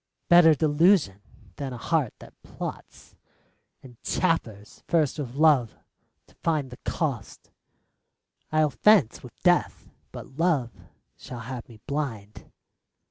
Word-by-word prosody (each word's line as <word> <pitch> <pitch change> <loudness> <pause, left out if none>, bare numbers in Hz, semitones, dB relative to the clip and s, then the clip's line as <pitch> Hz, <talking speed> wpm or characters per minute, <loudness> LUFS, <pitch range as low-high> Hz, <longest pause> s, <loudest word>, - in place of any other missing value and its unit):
Better 175 -2 +7
delusion 150 - +2 0.4
than 135 -3 -5
a - - -6
heart 145 -1 -1
that - - -15
plots, - - -9 0.7
And 125 -3 -15
chaffers 110 - -2
first 155 -4 +1
with 130 -3 -5
Love 145 -6 +3 0.5
to - - -25
find 150 -5 -1
the 125 - -10
cost: 135 -11 -4 1.0
I'll 155 -1 +2
fence 170 - +3
with - - -14
Death, - - +1 0.2
but 135 +4 -11
Love 150 -9 +1 0.5
shall 125 -2 -9
have 125 +1 -8
me 110 -2 -15
blind. 120 -9 -5
140 Hz, 120 wpm, -26 LUFS, 120-160 Hz, 1.0 s, Better